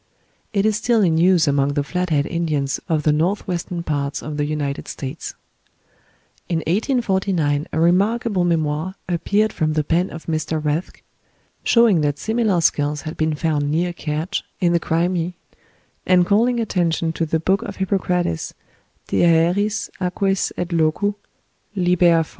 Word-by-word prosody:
It 200 -1 +1
is 215 -1 +2
still 230 -1 +2
in 160 -3 +2
use 175 -2 +4
among 140 0 +1
the 145 - +1
Flat 180 +5 -2
head 145 -3 +2
Indians 155 -5 -1
of 155 -2 +1
the 155 - +3
north 170 +7 0
western 175 -1 -3
part 145 -2 -2
of 150 0 -5
the 145 - 0
United 145 -2 -3
States. 140 +3 -6 1.1
In 165 -2 0
1849 190 - 0
a 160 - -1
remarkable 195 +4 +2
memoir 165 +1 0
appeared 200 +5 +1
from 155 -1 0
the 155 -1 +1
pen 170 +5 +1
of 165 - -10
M. 165 - -1 0.3
Rathke, 150 +4 -2 0.6
showing 230 -8 +4
that 145 -1 0
similar 220 -4 +1
skulls 145 -2 +1
had 155 +1 -5
been 155 -1 0
found 150 -2 0
near 175 +3 0
Kertsch, 160 +4 -3 0.2
in 175 -2 +2
the 170 - +3
Crimea, 170 +1 0 0.7
and 180 -1 +5
calling 235 +6 +2
attention 170 -6 0
to 165 0 -2
the 160 +1 0
book 190 +5 +1
of 200 - -6
Hippocrates, 180 - -1 0.5
"De - - +2
Aeris, 175 +5 +2
Aquis 195 +1 0
et 175 - -2
Locu," 165 +5 +1 0.6
lib. 180 -2 +1
iv. 165 -2 +5
170 Hz, 155 wpm, -21 LUFS, 155-190 Hz, 1.1 s, and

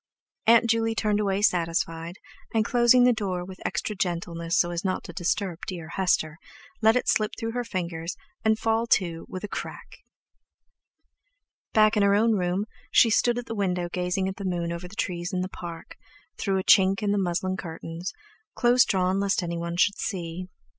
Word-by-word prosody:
Aunt 235 +1 +6
Juley 225 0 +1
turned 210 -2 +1
away 200 -1 0
satisfied, 165 -2 0 0.4
and 220 -1 +3
closing 240 +1 +5
the 250 0 +5
door 185 -5 -3
with 185 0 -11
extra 210 - -2
gentleness 170 -2 -2
so 175 - +2
as 170 -1 -3
not 185 -1 -1
to 175 - -9
disturb 175 +1 -1
dear 170 -4 -6
Hester, 170 -4 0 0.4
let 220 +1 +5
it 250 - 0
slip 215 -1 +1
through 225 0 -3
her 245 +1 -2
fingers 170 -5 -4 0.3
and 220 -1 +3
fall 225 +1 0
to 170 -7 +1
with 185 - -6
a - - -3
"crack." - - -7 1.7
Back 215 0 +5
in 210 - +3
her 200 0 +4
own 225 +2 +3
room, 185 0 0 0.2
she 230 - +5
stood 240 +2 +3
at 245 - -4
the 225 - -5
window 180 -4 -1
gazing 180 +1 -1
at 190 - -5
the 200 - -6
moon 175 -2 -2
over 170 +1 -5
the 190 - -13
trees 175 -1 -3
in 180 - 0
the 185 - -3
Park, 170 -3 -9 0.4
through 195 -2 -1
a 190 - -1
chink 195 +3 +5
in 205 - +1
the 205 - +1
muslin 185 0 -1
curtains, 165 0 -6 0.4
close 245 0 +5
drawn 190 -1 +1
lest 200 -1 +1
anyone 170 0 -3
should 200 +3 +2
see. 180 -2 -4
190 Hz, 185 wpm, -26 LUFS, 175-215 Hz, 1.7 s, Aunt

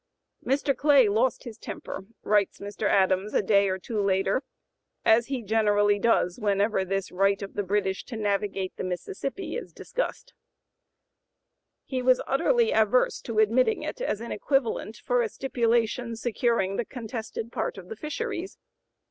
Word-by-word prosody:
"Mr. 275 +2 +1
Clay 285 -5 +5
lost 225 +5 +1
his 235 -4 -9
temper," 190 - -7 0.2
writes 205 -2 +2
Mr. 205 +1 -3
Adams 190 +1 +2
a - - +4
day 200 0 +4
or 185 - -1
two 210 +3 -3
later, 195 +3 +1
(p. - - -46 0.6
089) 220 - +7
"as 235 +1 -1
he 265 -4 -3
generally 205 -1 +3
does 200 -4 +2
whenever 205 -1 +1
this 195 +1 -2
right 195 +2 +2
of 195 - -7
the - - -1
British 195 -1 -1
to 235 - -6
navigate 200 -2 -1
the - - -4
Mississippi 185 - -4
is 485 - -5
discussed. - - -4 1.5
He 260 -2 -2
was 255 0 +4
utterly 465 - +2
averse 220 +3 +2
to 230 -2 -5
admitting 230 - +3
it - - -5
as 225 - -1
an 235 - -6
equivalent 230 -2 -1
for 245 +2 +1
a 225 - 0
stipulation 235 -1 0
securing 225 -4 0
the 240 - -1
contested 225 -1 -6
part - - -3
of 185 -2 -10
the 220 - -6
fisheries. 365 - -4
220 Hz, 160 wpm, -27 LUFS, 200-255 Hz, 1.5 s, 089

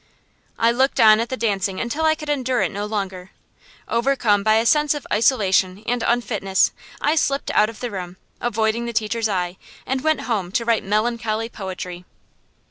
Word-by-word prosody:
I 230 0 +3
looked 260 +3 +1
on 215 -1 +7
at 230 - -2
the 260 - -3
dancing 200 -3 -1
until 285 +7 -1
I 315 0 +4
could 305 -1 -9
endure 260 -3 0
it - - -1
no 205 +1 -4
longer. 190 -3 -4 0.6
Overcome 235 -4 +2
by 215 +1 +3
a 225 +1 +2
sense 300 +3 +3
of 290 - -6
isolation 200 -4 +2
and 240 +1 -1
unfitness, 215 -5 +1 0.3
I 295 - +2
slipped 275 -3 0
out 210 +1 +3
of 225 - -11
the 245 -2 -3
room, 180 -2 -6 0.2
avoiding 225 0 0
the 235 - -4
teacher's 220 0 0
eye, 180 -2 -2 0.3
and 265 0 -1
went 315 +1 +1
home 200 -7 -2
to 230 - 0
write 230 -1 +1
melancholy 220 +2 -1
poetry. 185 -4 -7
225 Hz, 180 wpm, -21 LUFS, 200-245 Hz, 0.6 s, on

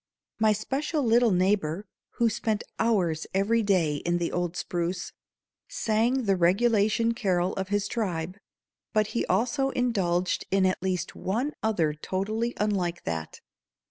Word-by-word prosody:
My 220 -1 +4
special 275 +8 -1
little 235 0 +4
neighbor, 185 -1 +1 0.3
who 235 - +2
spent 220 -1 -1 0.2
hours 180 -9 +1
every 220 +4 +2
day 180 -8 +2
in 175 +4 0
the 170 -1 -1
old 175 -1 -2
spruce, 175 +1 -3 0.5
sang 230 +4 +1
the 195 -3 +2
regulation 215 +5 +3
carol 185 -5 0
of 190 0 -3
his 205 0 0
tribe, 185 -4 -3 0.5
but 215 0 +3
he 235 - -1
also 250 +8 +1
indulged 190 -9 0
in 195 0 +3
at 185 -1 0
least 185 -1 -2
one 245 +10 -2
other 175 -9 +1
totally 215 +9 -2
unlike 185 -5 -1
that. 80 -1 -5
200 Hz, 140 wpm, -27 LUFS, 175-230 Hz, 0.5 s, My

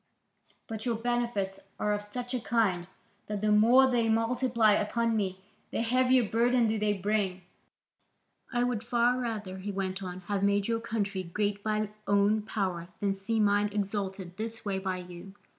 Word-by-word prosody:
But 220 -1 -6
your 235 -2 0
benefits 230 -4 -1 0.2
are 210 - +1
of 205 - -1
such 245 +4 -5
a 250 - 0
kind 210 -7 +1 0.4
that 210 -1 -3
the 215 0 +2
more 235 +5 +6
they 235 -3 +2
multiply 230 0 +3
upon 230 +2 +1
me, 190 -3 -1 0.3
the - - -1
heavier 255 0 +3
burden 240 +2 +3
do 220 0 0
they 210 0 +2
bring. 195 -2 -1 1.1
I 240 -1 +1
would 245 -3 -1
far 240 +1 +2
rather," 210 -6 -4
he 205 +2 -4
went 195 0 -3
on, 185 -1 -6
"have 195 +2 -2
made 200 0 +2
your 230 -1 0
country 205 -4 -2
great 205 +3 -2
by 215 -1 -1 0.2
own 205 +2 +3
power 190 -5 -2
than 200 -1 +1
see 195 +4 -2
mine 205 0 +3
exalted 200 -2 -3
in - - -18
this 225 +1 -5
way 195 -2 -1
by 190 -1 -2
you. 180 +2 -10
210 Hz, 175 wpm, -29 LUFS, 195-230 Hz, 1.1 s, more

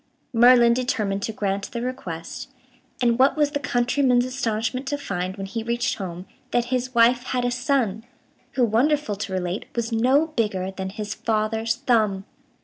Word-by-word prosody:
Merlin 240 0 +6
determined 215 -6 -1
to 220 - -2
grant 200 -2 -2
the 235 - -4
request, 185 -11 -6 0.5
and 235 0 +2
what 270 +4 +4
was 295 -1 +2
the 285 - -1
countryman's 250 -1 +2
astonishment 255 0 -2
to 290 - -1
find 185 -7 -4
when 195 - -4
he 225 +4 -4
reached 235 +1 -1
home 180 -1 -6 0.2
that 240 -1 +1
his 255 0 -2
wife 240 +1 +5
had 250 -1 -1
a 245 - +1
son, 245 -4 0 0.5
who, 250 - +3
wonderful 245 +1 +1
to 200 -1 -5
relate, 185 +1 -2
was 235 0 -2
no 255 +7 +3
bigger 205 -9 -1
than 190 0 -5
his 210 +1 -5
father's 225 +1 -1
thumb! 220 -6 +1
230 Hz, 165 wpm, -24 LUFS, 205-255 Hz, 0.5 s, Merlin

